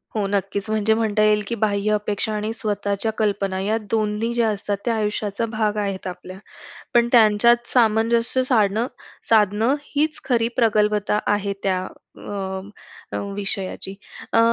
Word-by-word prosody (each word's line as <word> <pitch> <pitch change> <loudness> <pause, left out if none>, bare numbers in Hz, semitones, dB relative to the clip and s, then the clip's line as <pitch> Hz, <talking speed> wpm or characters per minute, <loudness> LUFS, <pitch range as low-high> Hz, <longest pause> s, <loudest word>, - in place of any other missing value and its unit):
हो. 210 -2 0
नक्कीच. 200 +1 -1
म्हणजे 215 0 +2
म्हणता 220 -1 +1
येईल, 210 0 +4
की 235 - -2
बाह्य 205 0 +1
अपेक्षा 210 +1 -1
आणि 210 +1 -2
स्वतःच्या 205 -1 -1
कल्पना 200 -3 0
या 215 +3 0
दोन्ही 220 +1 0
ज्या 235 -2 +2
असतात, 205 0 -2
त्या 230 -1 +1
आयुष्याचा 210 0 -1
भाग 215 -2 -1
आहेत 195 -2 -3
आपल्या. 185 +1 -8 0.6
पण 235 0 +4
त्यांच्यात 235 +1 +5
सामंजस्य 230 +1 +2
साडणं 220 -2 +2 0.4
साधणं 220 +4 +3 0.2
हीच 305 +2 0
खरी 235 -3 +1
प्रगल्भता 210 -3 +2
आहे 205 -1 0
त्या 185 -1 0 0.4
अ, 190 -1 -5 0.5
अ, - - -2 0.2
विषयाची. 195 -1 -4 0.4
अ, - - +4
210 Hz, 140 wpm, -22 LUFS, 200-225 Hz, 0.6 s, त्यांच्यात